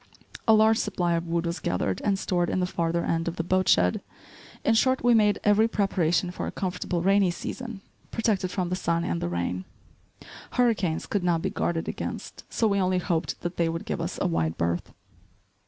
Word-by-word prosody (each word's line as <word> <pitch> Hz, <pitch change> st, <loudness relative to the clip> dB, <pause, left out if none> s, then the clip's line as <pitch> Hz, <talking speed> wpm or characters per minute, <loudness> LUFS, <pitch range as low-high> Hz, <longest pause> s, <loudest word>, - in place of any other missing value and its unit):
A 220 Hz, -, +7 dB
large 220 Hz, +1 st, +5 dB
supply 180 Hz, -4 st, 0 dB
of 170 Hz, 0 st, -1 dB
wood 170 Hz, 0 st, 0 dB
was 170 Hz, +1 st, -2 dB
gathered 90 Hz, +1 st, -1 dB
and 200 Hz, -2 st, +1 dB
stored 175 Hz, -2 st, 0 dB
in -, -, 0 dB
the 180 Hz, -, +2 dB
farther 170 Hz, -1 st, -1 dB
end 165 Hz, 0 st, 0 dB
of 170 Hz, -, -2 dB
the 165 Hz, -, -2 dB
boat 185 Hz, +2 st, +1 dB
shed; 90 Hz, 0 st, +3 dB, 0.6 s
in 225 Hz, -, +4 dB
short 260 Hz, +3 st, +2 dB
we 245 Hz, 0 st, +5 dB
made 210 Hz, -3 st, +4 dB
every 210 Hz, +2 st, +4 dB
preparation 180 Hz, -5 st, +1 dB
for -, -, -4 dB
a -, -, -3 dB
comfortable 180 Hz, -2 st, -2 dB
rainy 195 Hz, 0 st, +4 dB
season, 230 Hz, +4 st, -6 dB, 0.3 s
protected 215 Hz, -5 st, 0 dB
from 180 Hz, -1 st, -2 dB
the 185 Hz, +1 st, -2 dB
wind 170 Hz, 0 st, +2 dB
and 85 Hz, -, -2 dB
the 85 Hz, -, -1 dB
rain. 85 Hz, +1 st, -2 dB, 0.9 s
Hurricanes 215 Hz, -10 st, +1 dB
could 200 Hz, -3 st, -1 dB
not 170 Hz, -2 st, +1 dB
be 190 Hz, -, -1 dB
guarded 170 Hz, -5 st, -1 dB
against, -, -, -6 dB
so 225 Hz, -, +2 dB
we 200 Hz, -1 st, +1 dB
only 185 Hz, 0 st, +2 dB
hoped 175 Hz, -2 st, -1 dB
that 175 Hz, +1 st, -4 dB
they 170 Hz, -1 st, +2 dB
would 165 Hz, 0 st, -4 dB
give -, -, -3 dB
us -, -, -3 dB
a -, -, 0 dB
wide 80 Hz, -1 st, 0 dB
berth. 85 Hz, +1 st, -1 dB
180 Hz, 205 wpm, -26 LUFS, 165-200 Hz, 0.9 s, A